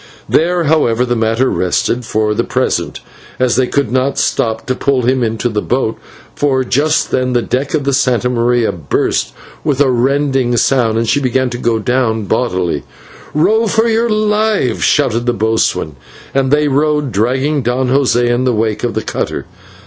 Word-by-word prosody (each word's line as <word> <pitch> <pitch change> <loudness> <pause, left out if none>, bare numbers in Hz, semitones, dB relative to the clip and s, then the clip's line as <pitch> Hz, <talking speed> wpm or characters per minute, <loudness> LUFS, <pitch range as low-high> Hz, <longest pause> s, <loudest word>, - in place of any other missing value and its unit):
There, 175 +2 +1
however, 125 -6 +2
the 120 -1 -1
matter 115 +3 +1
rested 115 +6 -1
for 110 -1 0
the - - 0
present, - - -2 0.4
as 130 -2 +1
they 130 +1 +2
could 140 -5 -1
not 130 +2 0
stop 110 -1 -1
to 130 - 0
pull 130 -1 0
him 130 +2 +1
into 115 +1 -1
the 105 -3 -2
boat, 125 -3 -1 0.4
for 135 -2 +1
just 145 +5 0
then 130 0 0
the 120 -1 +1
deck 135 +4 -2
of 150 - -1
the 140 - 0
/Santa 125 -2 +1
Maria/ 120 -1 +1
burst 80 -5 -1 0.3
with 145 -4 0
a 140 -3 +3
rending 130 0 +1
sound, 115 -3 +2
and 115 0 0
she 140 - +2
began 130 -1 0
to 120 - -5
go 115 -1 +1
down 115 -1 0
bodily. 90 - -1 0.5
"Row 220 +9 +2
for 225 +2 +2
your 230 +1 +1
lives," 215 - +1
shouted 120 -5 +1
the 120 - +2
boatswain, 110 -9 -1 0.4
and 135 -1 +1
they 150 +1 +2
rowed, 150 0 +1
dragging 130 +8 0
Don 125 +2 -1
José 130 -2 +2
in 120 +1 +1
the 130 -1 +1
wake 110 -1 -1
of 120 -3 -2
the 110 - -2
cutter. - - -3
125 Hz, 180 wpm, -14 LUFS, 115-140 Hz, 0.5 s, a